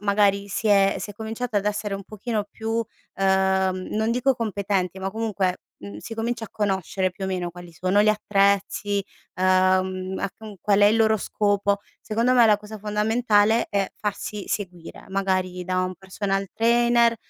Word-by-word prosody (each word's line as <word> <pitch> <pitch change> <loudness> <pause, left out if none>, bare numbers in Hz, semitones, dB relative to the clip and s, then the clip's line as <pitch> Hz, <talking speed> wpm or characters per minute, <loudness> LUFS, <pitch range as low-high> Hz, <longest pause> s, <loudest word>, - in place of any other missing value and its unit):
magari 200 -1 +2
si 215 - -3
è 195 -1 +4
si 205 - -5
è - - -8
cominciato 220 +1 -4
ad 200 - +1
essere 210 -1 -1
un 195 -1 -6
pochino 215 +1 -3
più, 225 +1 -2 0.3
ehm, 190 -1 +1
non 220 +1 0
dico 255 +2 +2
competenti 200 -5 -1
ma 195 0 -2
comunque, 200 -4 -1 0.2
mhmm, 100 0 -9
si 225 - -7
comincia 230 +1 -2
a 215 - -10
conoscere 190 -3 -1
più 190 +2 -7
o - - -1
meno 180 -2 -2
quali 175 0 -12
sono 185 +5 +2
gli 215 - +3
attrezzi, 200 -1 +1 0.3
ehm, 185 0 +2
a 200 - -2
con 215 -2 -10
qual 205 -1 +2
è - - +7
il 215 - +4
loro 220 -1 +4
scopo, 205 0 0 0.2
secondo 230 +4 +1
me 245 -2 +7
la 210 -1 +5
cosa 210 +1 -10
fondamentale 215 +1 +2
è 200 -1 0
farsi 205 0 -4
seguire, 180 -5 -5
magari 185 -2 -1
da 185 0 0
un 185 0 -2
personal 195 +1 -2
trainer, 235 0 +3
200 Hz, 175 wpm, -24 LUFS, 190-220 Hz, 0.3 s, è